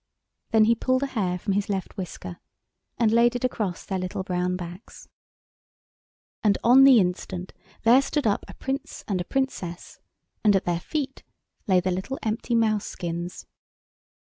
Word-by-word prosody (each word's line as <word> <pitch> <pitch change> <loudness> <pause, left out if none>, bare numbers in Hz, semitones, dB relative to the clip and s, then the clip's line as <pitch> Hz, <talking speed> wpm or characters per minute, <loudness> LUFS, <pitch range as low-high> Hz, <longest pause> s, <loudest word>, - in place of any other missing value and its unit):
Then 220 -2 +5
he 225 +2 +5
pulled 255 +3 0
a 275 - -4
hair 185 -6 0
from 195 +2 -2
his 200 +1 -1
left 195 -2 -3
whisker 165 - -7 0.6
and 225 -2 +3
laid 235 +1 +4
it 245 - -3
across 210 -8 -2
their 190 -1 -2
little 185 +1 -3
brown 180 0 -1
backs. 180 +3 -9 1.4
And 205 -2 +4
on 260 +3 +7
the 265 -4 +8
instant 180 0 -2 0.3
there 240 +4 +6
stood 290 0 -2
up 205 -2 +1
a - - -11
Prince 270 +1 -4
and 190 -3 -1
a - - -5
Princess 190 -11 -3 0.4
and 210 -2 +5
at 195 - +1
their 175 -1 0
feet 290 - -4 0.5
lay 185 -2 +5
the 185 +1 -1
little 190 +9 -3
empty 225 +2 -1
mouse 215 -2 +2
skins. 170 +1 -5
205 Hz, 165 wpm, -25 LUFS, 180-240 Hz, 1.4 s, the